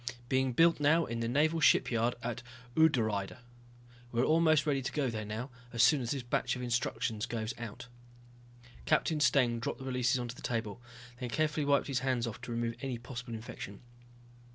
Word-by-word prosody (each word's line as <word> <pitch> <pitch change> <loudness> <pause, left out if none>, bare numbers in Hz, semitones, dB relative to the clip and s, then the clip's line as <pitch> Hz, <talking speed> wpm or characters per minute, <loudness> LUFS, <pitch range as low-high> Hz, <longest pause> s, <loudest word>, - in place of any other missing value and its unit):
"Being 130 -1 +1
built 165 +5 +4
now 155 +3 +4
in 115 0 -4
the 115 - -1
naval 155 +6 +2
shipyard 120 -5 +3
at 120 0 -3 0.3
Udrydde. 110 -12 +2 0.7
We're 120 +1 +1
almost 155 -2 +4
ready 140 -3 +1
to 130 - -3
go 140 -5 0
there 110 -1 -4
now, 110 +5 -5 0.3
soon 135 +4 +5
as 120 - -3
this 135 -1 -2
batch 120 +1 0
of 125 - -5
instructions 120 -2 -1
goes 115 0 -3
out." 120 -1 -7 1.0
Captain 155 0 +2
Steng 125 -5 +3
dropped 115 - -3
the 130 - -9
releases 125 -1 +1
onto 120 -1 -4
the - - -13
table, 115 -1 -3 0.4
then 125 -2 -4
carefully 150 +4 0
wiped 140 -1 +3
his 135 -3 -1
hands 130 -2 0
off 115 0 -6
to 125 - -7
remove 115 0 -2
any 135 -3 -3
possible 120 -1 -7
infection. 105 -3 -8
125 Hz, 175 wpm, -32 LUFS, 115-140 Hz, 1.0 s, soon